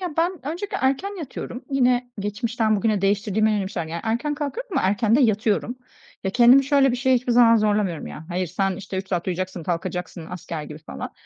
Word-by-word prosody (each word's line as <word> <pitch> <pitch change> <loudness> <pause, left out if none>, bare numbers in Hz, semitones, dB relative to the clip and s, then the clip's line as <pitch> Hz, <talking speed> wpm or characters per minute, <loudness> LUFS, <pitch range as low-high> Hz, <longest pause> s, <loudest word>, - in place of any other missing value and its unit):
ya, 355 -5 -5
ben 340 +3 +2
öncelikle 350 +6 -3
erken 360 +10 0
yatıyorum, 265 -4 -7
yine 250 -2 +2
geçmişten 220 +1 0
bugüne 215 -1 +1
değiştirdiğim 205 +2 +1
en 215 - +3
önemli 195 -1 -2
şeyler. 170 -5 -3
Yani 170 +1 -4
erken 240 +7 -1
kalkıyorum, 390 - -5
ama - - +1
erken 210 +3 +2
de 285 - +3
yatıyorum. 220 +1 +1 0.5
Ya, 190 - 0
kendimi 250 +4 +6
şöyle 275 -1 +4
bir 250 - -1
şey 260 +1 +2
hiçbir 245 0 0
zaman 230 -1 +6
zorlamıyorum 205 -6 0
ya, 155 - -8
"Hayır, 180 +1 -1
sen, 190 +3 -1
işte, 190 -1 -6
3 190 0 -4
saat 175 -1 -2
uyuyacaksın, 185 -1 -3
kalkacaksın." 175 0 -4
asker 165 -3 -6
gibi 150 +1 -9
falan. 155 - -8
215 Hz, 205 wpm, -23 LUFS, 185-255 Hz, 0.5 s, kendimi